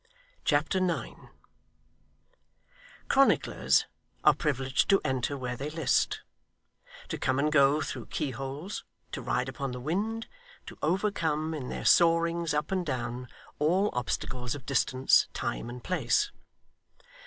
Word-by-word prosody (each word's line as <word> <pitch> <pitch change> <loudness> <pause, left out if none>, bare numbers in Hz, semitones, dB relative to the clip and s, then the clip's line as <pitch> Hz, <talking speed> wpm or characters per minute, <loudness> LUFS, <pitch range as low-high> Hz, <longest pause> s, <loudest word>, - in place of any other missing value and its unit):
Chapter 150 +6 +2
9 180 -3 -2 1.8
Chronicler's 275 0 +3 0.4
are - - +7
privileged 135 -3 0
to 195 -1 +6
enter 130 +1 -1
where 125 -2 -3
they 140 +4 -4
list, 155 -3 +1 0.9
to - - -3
come 130 0 +1
and 150 +2 +2
go 145 0 +5
through - - -5
keyholes, 140 - -4 0.3
to - - -4
ride 125 +1 -1
upon 135 0 -4
the 125 - -5
wind, 205 - -2 0.4
to - - -9
overcome, 160 -3 0
in 135 -5 -5
their - - -5
soarings 170 0 +4
up 150 +4 -1
and 185 -1 +1
down, 125 -4 -3 0.3
all 180 +7 +2
obstacles 125 +1 -2
of 135 -3 -10
distance, 130 0 +3
time, 115 - -3
and 125 0 -8
place. 410 - +1
150 Hz, 125 wpm, -29 LUFS, 130-170 Hz, 1.8 s, are